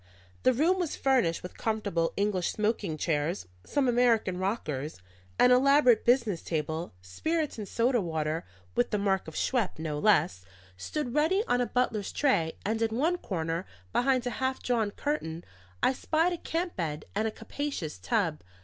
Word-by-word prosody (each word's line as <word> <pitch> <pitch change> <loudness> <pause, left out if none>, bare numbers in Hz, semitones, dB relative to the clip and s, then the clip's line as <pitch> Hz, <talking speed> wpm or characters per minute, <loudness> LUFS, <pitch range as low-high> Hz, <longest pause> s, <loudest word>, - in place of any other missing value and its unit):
The 255 - +5
room 325 +9 +2
was 345 -4 -1
furnished 255 -12 +2
with 180 - -9
comfortable 200 -7 0
English 200 -3 +1
smoking 210 -5 0
room - - -5
chairs, 155 +3 -1 0.2
some 280 -2 0
American 235 -6 +3
rockers, 155 - -3 0.4
and 250 - +6
an 250 - +6
elaborate 275 -3 +5
business 235 -8 +3
table; 160 - -3
spirits 300 - -2
and 210 - -5
soda 240 +2 +2
water 160 -2 -2 0.3
(with 120 - +1
the 210 - 0
mark 195 -3 0
of 160 - -8
Schweppe, 240 -7 0
no 155 -2 -3
less) 150 - +3 0.3
stood 245 - -4
ready 325 +8 +3
on 245 - +2
a 245 - 0
butler's 225 -5 0
tray, 170 - +2
and 220 +2 0
in 225 0 0
one 335 +6 +1
corner, 165 - -2 0.3
behind 255 -1 +2
a 245 - -1
half 260 0 0
drawn 230 -4 +1
curtain, 175 - -3 0.4
I - - +4
spied 325 +6 +1
a - - -3
camp 340 +2 -2
bed 155 -4 -3
and 215 +2 0
a - - -2
capacious 225 - -5
tub. 190 -10 0
220 Hz, 170 wpm, -29 LUFS, 165-260 Hz, 0.4 s, and